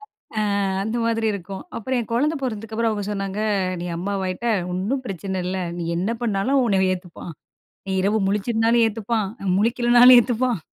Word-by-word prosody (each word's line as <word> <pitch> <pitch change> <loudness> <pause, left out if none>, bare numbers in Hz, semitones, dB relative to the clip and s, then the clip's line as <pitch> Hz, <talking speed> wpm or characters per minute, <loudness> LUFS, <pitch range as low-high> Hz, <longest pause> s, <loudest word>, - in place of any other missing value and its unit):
அ 425 - -20 0.6
அந்த 220 +3 -2
மாதிரி 225 -1 0
இருக்கும். 195 0 -6
அப்புறம் 255 +3 -2
என் 230 - -7
குழந்தை 295 +7 +1
பொறந்ததுக்கு 220 -3 -4
அப்புறம், 230 0 +1
அவங்க 205 -1 -3
சொன்னாங்க. 195 0 -3 0.4
"நீ 175 - -4
அம்மாவாயிட்ட, 190 +3 -3 0.3
ஒண்ணும் 210 +9 -2
பிரச்சனை 190 -1 -4
இல்லை. 185 0 -2 0.2
நீ - - -3
என்ன 185 +5 -1
பண்ணாலும் 220 +4 0
அவன் 265 - +4
உன்னை 200 -4 +2
அவன் 185 - +2
ஏத்துப்பான். 180 -1 -9 0.5
நீ - - -4
இரவு 210 +3 +2
முழிச்சிருந்தாலும் 225 +3 +2
ஏத்துப்பான். 220 -1 -1 0.3
முழிக்கலனாலும் 240 +3 +6
ஏத்துப்பான். 240 -1 0
220 Hz, 160 wpm, -22 LUFS, 195-235 Hz, 0.6 s, முழிக்கலனாலும்